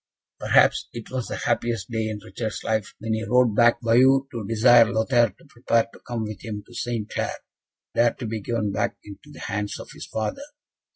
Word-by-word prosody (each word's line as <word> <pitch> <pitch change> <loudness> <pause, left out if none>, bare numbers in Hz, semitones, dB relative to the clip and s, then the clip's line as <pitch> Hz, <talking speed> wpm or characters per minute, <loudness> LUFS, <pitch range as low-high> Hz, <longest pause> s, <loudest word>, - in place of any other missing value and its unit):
Perhaps - - +3
it 120 -2 -8
was 130 -2 -3
the - - -4
happiest 115 -3 -1
day 110 -1 -1
in 105 -1 -5
Richard's 110 +3 -5
life 110 -1 -1
when 110 +1 -3
he 110 0 -1
rode 125 -2 +3
back 120 +1 +5
to - - -12
Bayeux, 130 +4 +5
to 115 -5 -5
desire 115 0 +6
Lothaire 120 +1 +3
to 170 - -21
prepare 120 -3 0
to - - -14
come 120 -2 -4
with 110 -1 -7
him 105 -3 -5
to 120 - -17
St. 120 -3 -3
Clair, - - -3 0.6
there 120 0 +3
to 125 - -6
be 110 -1 -3
given 110 -1 -1
back - - -1
into 105 +8 -12
the - - -12
hands 105 -1 -3
of - - -10
his - - -9
father. 110 - -3
115 Hz, 210 wpm, -24 LUFS, 110-120 Hz, 0.6 s, desire